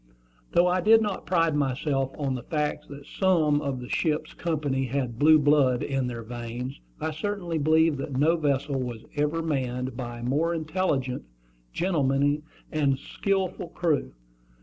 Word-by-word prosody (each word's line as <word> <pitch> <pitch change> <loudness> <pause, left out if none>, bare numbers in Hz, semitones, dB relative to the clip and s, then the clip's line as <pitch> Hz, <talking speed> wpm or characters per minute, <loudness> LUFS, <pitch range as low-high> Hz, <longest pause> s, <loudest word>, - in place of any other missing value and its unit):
Though 175 - +5
I 180 +1 +2
did 220 +2 +6
not 205 -2 -3
pride 165 -4 +2
myself 135 -1 0
on 140 -3 -1
the 125 - -4
fact 150 +3 -2
that 140 0 -10
some 160 -5 +2
of 140 -3 -2
my 125 - -7
ship's 155 +2 -1
company 145 -5 -1
had 125 -2 -2
"blue 155 +1 +7
blood" 145 -4 +3
in 135 -2 -1
their 120 -2 -5
veins, 120 +2 -6 0.2
I 160 - -2
certainly 175 0 -3
believed 160 0 +3
that 135 -1 -4
no 155 +5 +4
vessel 140 -3 0
was 120 -3 -5
ever 150 +3 0
manned 130 -4 -2
by 120 -2 -5
a - - -7
more 155 +7 +1
intelligent, 155 -6 -1 0.5
gentlemanly, 145 -4 +1 0.3
and 140 -3 +2
skilful 190 +4 -2
crew. 160 - -1
145 Hz, 155 wpm, -26 LUFS, 130-165 Hz, 0.5 s, blue